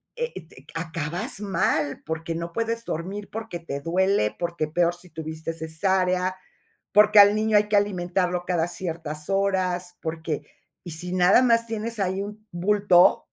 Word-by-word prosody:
e 480 0 -3
et 160 - -10
eh, 135 - -16
acabas 165 +1 -3
mal 155 -7 0
porque 160 +1 -3
no 170 0 -5
puedes 230 0 -2
dormir, 195 +5 -5
porque 220 -5 -5
te 140 -4 -5
duele, 175 - +1
porque 170 -2 -2
peor 170 +2 +1
si 180 0 -16
tuviste 160 0 -5
cesárea, 180 +3 0 0.6
porque 210 0 +6
al 205 +1 +8
niño 215 0 +1
hay 210 0 +2
que 210 - +4
alimentarlo 180 -2 0
cada 175 -2 0
ciertas 165 -3 -5
horas, 185 -2 0
porque 160 -2 -3 0.4
y 175 - -7
si 175 +3 -4
nada 185 +5 +5
más 230 -2 +3
tienes 225 0 -3
ahí 190 0 0
un 210 +1 -9
bulto 185 0 +4
180 Hz, 155 wpm, -25 LUFS, 165-205 Hz, 0.6 s, al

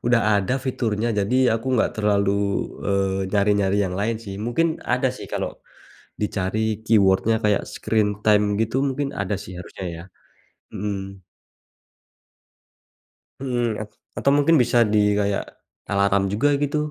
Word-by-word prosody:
udah 120 -1 +4 0.2
ada 125 +7 -1
fiturnya 115 -3 -1
jadi 100 +6 +1 0.2
aku 115 +3 -4
nggak - - +2
terlalu, 100 -2 +2 0.6
eee, 95 -1 +1
nyari-nyari 100 -1 +2
yang 90 - -3
lain 110 +2 0
sih. 100 -1 -6
Mungkin 160 +9 0
ada - - 0
sih, - - -8
kalo - - -3 0.6
dicari 105 0 -1 0.2
keyword-nya 110 +1 +3
kayak 105 -2 +2
screen 105 -2 -1
time 105 -1 +5 0.2
gitu 115 +3 0
mungkin 140 +1 -2
ada 100 +1 -1
sih 95 - -9
harusnya 90 +1 -8
ya. 85 - -8 0.7
Mhm. 95 -2 -5 2.2
Mhm, 120 -5 -1
at 105 - -8 0.3
atau 140 - +3
mungkin 150 +3 +4
bisa 120 0 +2
di 105 - +4 0.2
kayak 100 -1 0 0.5
alarm 100 0 +2
juga 120 +8 +2
gitu. 145 +1 0
105 Hz, 135 wpm, -23 LUFS, 100-120 Hz, 2.2 s, time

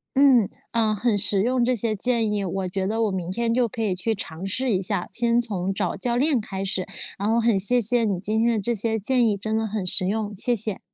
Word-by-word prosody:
嗯， 265 -6 +4 0.2
呃， 220 -2 +2
很 220 0 0
实 200 0 +5
用 250 +1 0
这 250 +1 +1
些 220 -1 -2
建 230 0 +1
议， 205 -1 -2
我 190 0 -4
觉 190 +1 -4
得 225 +2 -1
我 215 - -1
明 180 -2 -5
天 230 +3 -1
就 245 0 +1
可 230 +1 -7
以 200 - -1
去 220 +5 -2
尝 170 -1 -6
试 250 +5 -1
一 185 - 0
下， 180 -1 -3
先 235 0 0
从 195 -6 -2
找 - - -3
教 235 +4 -2
练 270 -1 +1
开 195 -2 -6
始， 185 -1 -1 0.3
然 200 +2 -3
后 230 - +1
很 230 -4 +1
谢 245 +6 +4
谢 235 +1 +3
你 195 -4 -2
今 215 +4 -1
天 235 0 +1
的 215 - -1
这 235 +4 -2
些 220 +1 +1
建 245 +4 +1
议， 205 -2 -1
真 220 +2 -3
的 220 0 -2
很 210 -3 -5
实 180 +1 +7
用， 210 0 -3
谢 240 +5 +1
谢。 215 -2 -1
220 Hz, 275 characters per minute, -22 LUFS, 195-235 Hz, 0.3 s, 实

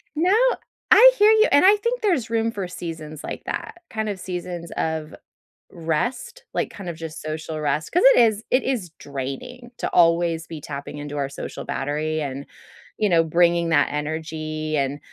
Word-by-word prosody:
No. 350 +5 +3 0.6
I - - +9
hear 420 +1 +7
you 440 +1 +5
and 285 +5 +6
I 400 +2 +8
think 470 +4 -2
there's 335 - +1
room 230 0 0
for 195 -5 -4
seasons 160 -4 -7
like - - -6
that, 350 - -5
kind 220 -1 -3
of 200 -2 -4
seasons 175 -2 -6
of 160 -1 -2 0.6
rest, 240 - -3
like, - - -1
kind 195 -3 -7
of 170 - -5
just 160 0 -7
social 155 0 -5
rest. 150 +1 -1
'Cause 355 - +2
it - - +5
is 220 -2 +3
it 255 - +3
is 240 -10 -2
draining 140 - -6
to - - -1
always 165 -1 +3
be 160 - -7
tapping 140 0 -7
into 145 0 -6
our 140 -1 -1
social - - -7
battery 150 +3 -2
and, 140 -1 -5 0.5
you 210 - +1
know, 165 -2 +4
bringing 170 +1 +2
that 145 -3 +3
energy 155 +1 -3
and 140 +1 -1
165 Hz, 180 wpm, -23 LUFS, 155-225 Hz, 0.6 s, I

